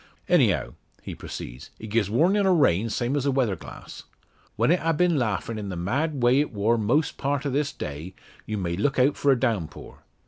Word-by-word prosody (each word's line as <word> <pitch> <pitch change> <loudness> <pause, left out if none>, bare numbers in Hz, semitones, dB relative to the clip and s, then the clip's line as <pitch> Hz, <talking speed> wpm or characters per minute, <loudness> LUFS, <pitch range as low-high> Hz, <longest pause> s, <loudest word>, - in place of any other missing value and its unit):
"Anyhow," - - +2 0.3
he - - -6
proceeds, 65 +6 -8
"it 110 -1 -9
gies 110 -3 +1
warnin' 185 - +3
o' 185 - +4
rain, 115 - +3
same 120 +5 -1
as 140 -1 0
a - - +3
weather 125 -7 +1
glass. 80 - -11 0.5
When - - +2
it 175 - +3
ha' 165 -1 0
been 175 -3 +3
laughin' 110 -1 -2
in 100 -2 -5
the 95 - -4
mad 130 - -1
way 125 +3 +5
it 150 - 0
wor 110 +1 +1
most 125 +9 +1
part 140 +1 -1
o' 140 - -1
this 140 +2 0
day, 75 +6 -7 0.3
you 110 - -2
may 85 -3 -2
look 135 +9 0
out 135 +3 +3
for 140 - +2
a 130 - +2
downpour. 105 - -3
120 Hz, 210 wpm, -25 LUFS, 100-145 Hz, 0.5 s, way